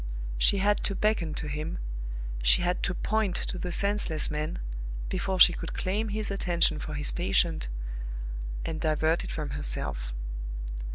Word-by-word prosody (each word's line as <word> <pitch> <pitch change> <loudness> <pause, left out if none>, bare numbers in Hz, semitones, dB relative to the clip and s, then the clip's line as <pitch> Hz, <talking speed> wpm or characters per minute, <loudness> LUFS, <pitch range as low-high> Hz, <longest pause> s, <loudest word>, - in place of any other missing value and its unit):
She 200 - +5
had 205 +1 +2
to 200 - 0
beckon 190 -8 +1
to - - -3
him, 150 - -3 0.6
she - - +5
had 180 +1 0
to 180 - -1
point 215 -3 0
to 185 - -3
the 180 - -3
senseless 200 -6 +2
man, 150 +1 -2 0.5
before 190 - -1
she 180 - +9
could - - -5
claim 210 +4 -1
his 215 0 -1
attention 170 -5 +1
for 150 0 -5
his 145 0 0
patient 170 - +1 1.0
and 160 -1 -3
divert 160 +1 +1
it - - -6
from 150 -3 -4
herself. 65 - +4
175 Hz, 155 wpm, -28 LUFS, 150-195 Hz, 1.0 s, she